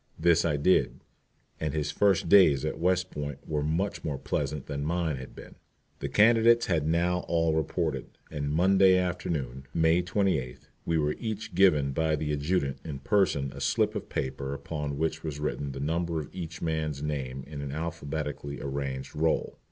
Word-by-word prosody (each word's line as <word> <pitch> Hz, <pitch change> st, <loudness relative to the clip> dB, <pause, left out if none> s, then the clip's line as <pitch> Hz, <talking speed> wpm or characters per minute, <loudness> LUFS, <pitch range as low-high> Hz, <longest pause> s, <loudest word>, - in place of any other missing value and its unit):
This 85 Hz, 0 st, +4 dB
I 75 Hz, -3 st, +1 dB
did, 90 Hz, +6 st, +2 dB, 0.6 s
and 75 Hz, -1 st, -2 dB
his 75 Hz, -1 st, -1 dB
first 100 Hz, -3 st, +2 dB
days 85 Hz, -9 st, +6 dB
at -, -, -3 dB
West 90 Hz, +1 st, +1 dB
Point 75 Hz, -1 st, -4 dB
were 75 Hz, -1 st, -1 dB
much 80 Hz, +7 st, -1 dB
more 75 Hz, -3 st, -2 dB
pleasant 75 Hz, +1 st, -3 dB
than 70 Hz, 0 st, -4 dB
mine 80 Hz, -2 st, -1 dB
had 65 Hz, 0 st, -9 dB
been. -, -, -11 dB, 0.5 s
The -, -, -3 dB
candidates 115 Hz, +2 st, +5 dB
had 80 Hz, -4 st, 0 dB
now 85 Hz, +2 st, +2 dB
all 80 Hz, -1 st, +2 dB
reported, 80 Hz, -2 st, -1 dB, 0.2 s
and 70 Hz, -2 st, -3 dB
Monday 95 Hz, +4 st, +5 dB
afternoon, 75 Hz, -8 st, -2 dB
May 80 Hz, +1 st, +4 dB
28th, 90 Hz, -9 st, -1 dB, 0.2 s
we 85 Hz, -, +2 dB
were 75 Hz, -1 st, +1 dB
each 110 Hz, -4 st, -4 dB
given 85 Hz, -7 st, +4 dB
by 80 Hz, +2 st, +1 dB
the 75 Hz, 0 st, -2 dB
Adjutant 70 Hz, -2 st, -1 dB
in 75 Hz, -4 st, -5 dB
person 70 Hz, -4 st, +1 dB
a -, -, -8 dB
slip -, -, +1 dB
of -, -, -5 dB
paper 70 Hz, +1 st, -3 dB
upon 70 Hz, 0 st, -4 dB
which 80 Hz, +1 st, -1 dB
was 75 Hz, -3 st, -4 dB
written 70 Hz, -1 st, -2 dB
the 70 Hz, -, -7 dB
number 80 Hz, +3 st, -1 dB
of 75 Hz, -, -8 dB
each 85 Hz, -3 st, -6 dB
man's 80 Hz, -3 st, -2 dB
name 65 Hz, -3 st, -3 dB
in 75 Hz, 0 st, -7 dB
an 70 Hz, -1 st, -5 dB
alphabetically 75 Hz, -2 st, -4 dB
arranged 70 Hz, -1 st, -4 dB
roll. 80 Hz, +1 st, 0 dB
80 Hz, 175 wpm, -28 LUFS, 70-85 Hz, 0.6 s, days